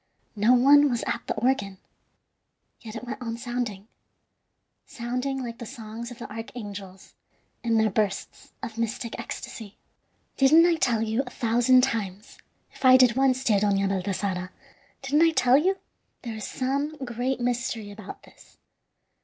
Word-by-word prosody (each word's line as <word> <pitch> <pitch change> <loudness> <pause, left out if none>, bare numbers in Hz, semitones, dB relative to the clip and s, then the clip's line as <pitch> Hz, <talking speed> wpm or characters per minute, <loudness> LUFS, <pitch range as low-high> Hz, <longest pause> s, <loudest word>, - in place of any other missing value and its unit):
No 215 +4 +4
one 285 +3 +6
was 240 -2 -1
at - - -2
the - - -1
organ, 210 -6 0 1.0
yet 220 -1 -10
it 225 - -6
went 255 +2 -6
on 230 -1 -4
sounding 235 -4 -4 1.0
sounding 250 +3 -3
like 235 -1 -7
the 235 - -6
songs 225 +1 -8
of 245 - -10
the 235 - -7
archangels 205 -4 -8 0.5
in 230 -1 +2
their 220 -1 +3
bursts 200 -1 -2
of 225 0 -6
mystic 230 0 -3
ecstasy. 210 -3 -7 0.6
"Didn't 310 +5 +6
I 350 - +4
tell 230 -7 +1
you 225 +3 0
a 255 - -8
thousand 245 +2 +3
times, 210 -5 -3 0.3
if - - -14
I 255 0 +8
did 250 -2 +5
once, 265 -1 +2
dear 215 -6 +3
Dona 200 -1 +2
Baltasara 190 -1 -2 0.5
didn't 285 +3 +2
I 330 - +6
tell 255 -2 +5
you? 380 +5 +1 0.5
There 235 -3 -5
is 215 -1 -6
some 280 +4 -2
great 245 +2 -2
mystery 240 -3 -2
about 205 -1 -10
this. - - -20
235 Hz, 155 wpm, -26 LUFS, 215-255 Hz, 1.0 s, I